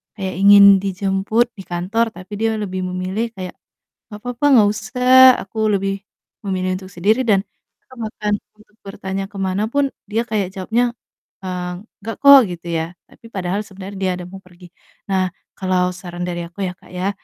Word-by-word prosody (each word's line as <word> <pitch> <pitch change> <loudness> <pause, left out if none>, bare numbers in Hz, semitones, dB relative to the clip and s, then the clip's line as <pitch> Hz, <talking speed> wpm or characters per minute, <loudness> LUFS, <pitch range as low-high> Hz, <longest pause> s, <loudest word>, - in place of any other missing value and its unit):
kayak 190 -4 -4
ingin 200 0 +8
dijemput 195 +4 0
di 195 - -9
kantor 190 +7 -1
tapi 185 +1 -12
dia 220 +1 0
lebih 185 -3 -3
memilih 185 +5 -3
kayak, 185 -2 -7 0.6
"Nggak 210 0 -9
papa, 245 +2 -4
nggak 215 -4 +6
usah 255 +3 +6
aku 220 +2 -2
lebih 195 0 -1 0.5
memilih 185 -1 -1
untuk 190 0 -12
sendiri," 215 +8 +2
dan 200 -4 +3 0.4
Kakak 260 - -17
bahkan 210 -1 -3 0.2
untuk 215 0 -24
bertanya 195 -1 -4
ke - - -32
mana 190 +3 0
pun, 280 +1 +1 0.2
dia 220 +2 0
kayak 210 -5 -1
jawabnya, 235 +5 0 0.5
eee, 180 -1 -4 0.3
"Nggak 225 0 -5
kok," 280 -1 +10
gitu 175 0 -8
ya. 165 +1 -2 0.2
Tapi - - -17
padahal 190 +1 -1
sebenernya 195 0 -9
dia 190 -1 0
ada 180 - -7
mau 195 - -9
pergi. 180 -1 -17 0.4
Nah, 190 -1 +2 0.3
kalau 185 -1 +1
saran 180 -1 -8
dari 175 -1 -3
aku 175 +4 -8
ya, 180 - -4
Kak, - - -19
ya, 185 +2 -1
195 Hz, 175 wpm, -19 LUFS, 185-220 Hz, 0.6 s, kok